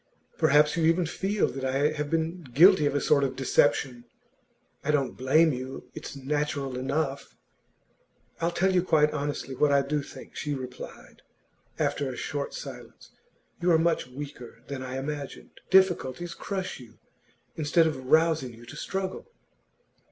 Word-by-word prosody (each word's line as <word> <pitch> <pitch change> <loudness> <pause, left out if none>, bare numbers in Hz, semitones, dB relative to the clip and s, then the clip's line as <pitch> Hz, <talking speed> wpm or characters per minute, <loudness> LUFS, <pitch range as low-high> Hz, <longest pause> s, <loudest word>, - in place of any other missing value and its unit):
Perhaps 150 +2 +4
you 165 -2 +1
even 165 +2 +3
feel 195 +5 0
that 135 - -6
I 135 +3 +1
have 150 -1 -3
been 165 +2 -1
guilty 155 +4 +5
of 145 - -1
a - - +3
sort 140 0 +3
of 130 -1 -1
deception. 120 -1 +1 0.8
I - - -4
don't 140 -8 +1
blame 145 +7 +4
you; 130 +1 -7
it's - - -8
natural 140 -1 -2
enough.' 140 +2 -2 1.0
'I'll 165 - +1
tell 190 +2 +1
you 180 - +4
quite 150 -4 +3
honestly 145 -2 -3
what 145 +3 +2
I 140 0 +4
do 145 +2 -1
think,' - - -12
she 145 -2 -2
replied, 130 -1 -9 0.6
after 140 -2 0
a - - -7
short 145 -1 -4
silence. - - -10 0.5
'You 175 - +2
are - - +6
much 165 -4 +1
weaker 125 -3 -9
than 140 -2 -5
I 130 0 -5
imagined. 140 +1 -6
Difficulties 175 -4 +3
crush 190 -4 -4
you, 115 -3 -14 0.6
instead 160 +2 +3
of 130 -5 -3
rousing 155 -5 +3
you 120 +1 -14
to - - -10
struggle. 190 - -4
145 Hz, 155 wpm, -27 LUFS, 130-165 Hz, 1.0 s, are